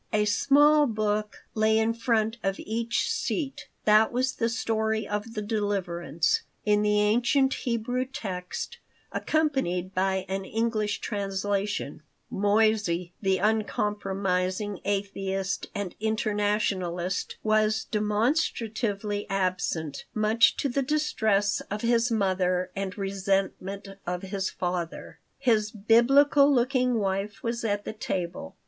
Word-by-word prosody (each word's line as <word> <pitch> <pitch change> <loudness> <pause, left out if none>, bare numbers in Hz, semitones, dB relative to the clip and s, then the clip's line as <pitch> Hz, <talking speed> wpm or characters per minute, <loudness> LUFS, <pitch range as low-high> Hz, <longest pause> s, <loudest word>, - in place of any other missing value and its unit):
A 210 -1 +2
small 290 +7 +5
book 215 -2 -2
lay 220 0 +3
in 220 +1 +2
front 230 -1 0
of 195 0 0
each 230 +2 -1
seat. 280 -5 -3 0.2
That 215 +1 +5
was 255 +2 0
the 230 - +1
Story 220 -2 -1
of 210 +3 -4
the 210 - -2
Deliverance, 195 -6 0 0.2
in 210 0 +3
the 210 0 +2
ancient 245 +6 +3
Hebrew 245 +1 -1
text, 195 -10 -5 0.3
accompanied 265 - 0
by 190 0 0
an 195 0 -2
English 215 0 -1
translation 200 0 -2 0.3
Moissey, 205 -4 +2
the 190 -2 +2
uncompromising 205 -2 -1
atheist 195 -1 -2
and 200 -3 -3
Internationalist, 205 -4 -1
was 215 0 +2
demonstratively 215 -2 -1
absent, 180 -6 -1
much 215 +1 +4
to - - 0
the 275 +1 0
distress 220 -8 +1
of 210 +1 -3
his 235 0 +2
mother 185 -4 +1
and 195 -1 -4
resentment 195 0 -2 0.2
of 180 +1 -2
his 190 0 -2
father. 175 -2 -4 0.2
His 225 -6 +2
Biblical 270 +7 +5
looking 250 -1 +2
wife 195 0 -2
was 235 0 -2
at 205 -2 -1
the - - -4
table. 175 - -4
210 Hz, 115 wpm, -27 LUFS, 195-230 Hz, 0.3 s, small